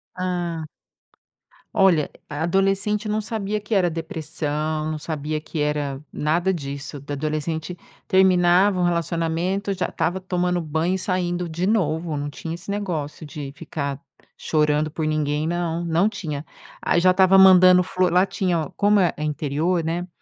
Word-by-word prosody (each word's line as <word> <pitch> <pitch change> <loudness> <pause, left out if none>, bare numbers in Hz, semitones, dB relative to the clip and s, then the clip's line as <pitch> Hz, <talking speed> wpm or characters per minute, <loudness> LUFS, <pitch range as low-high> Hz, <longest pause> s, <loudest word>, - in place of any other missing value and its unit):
Hã. 175 -3 -2 1.1
Olha, 175 -6 +3 0.2
a 145 +1 -5
adolescente 195 +4 +1
não 210 +1 0
sabia 215 -1 -3
que 210 +1 -2
era 180 -3 +3
depressão, 155 -1 -3
não 155 - -3
sabia 155 0 -3
que 155 +1 -6
era 150 -2 -1
nada 170 +5 +1
disso 140 -3 -5
da 145 +1 -7
adolescente 155 +3 -3 0.3
terminava 185 +1 +4
um - - +2
relacionamento, 170 +3 -1
já 185 -1 -1
estava 170 +3 -1
tomando 180 -1 -1
banho 160 +4 0
e - - -1
saindo 180 -2 -1
de 170 +3 -2
novo. 165 -6 0
Não 145 - -3
tinha 160 +3 -6
esse 180 +3 -7
negócio 170 -7 -3
de 145 -2 -7
ficar 140 -3 -4 0.3
chorando 150 0 +1
por 155 0 -3
ninguém 150 0 0
não, 170 0 -2
não 170 +5 +2
tinha. 150 -8 -5 0.4
Aí, 175 - +2
já 185 +1 +5
estava 190 +1 +5
mandando 185 -1 +8
flor 185 -1 0
lá 180 +2 +4
tinha 175 -6 -1
como 205 0 +3
é 175 -3 +2
é 150 - -5
interior, 155 +4 0
né, 170 +2 -2
170 Hz, 155 wpm, -23 LUFS, 155-185 Hz, 1.1 s, mandando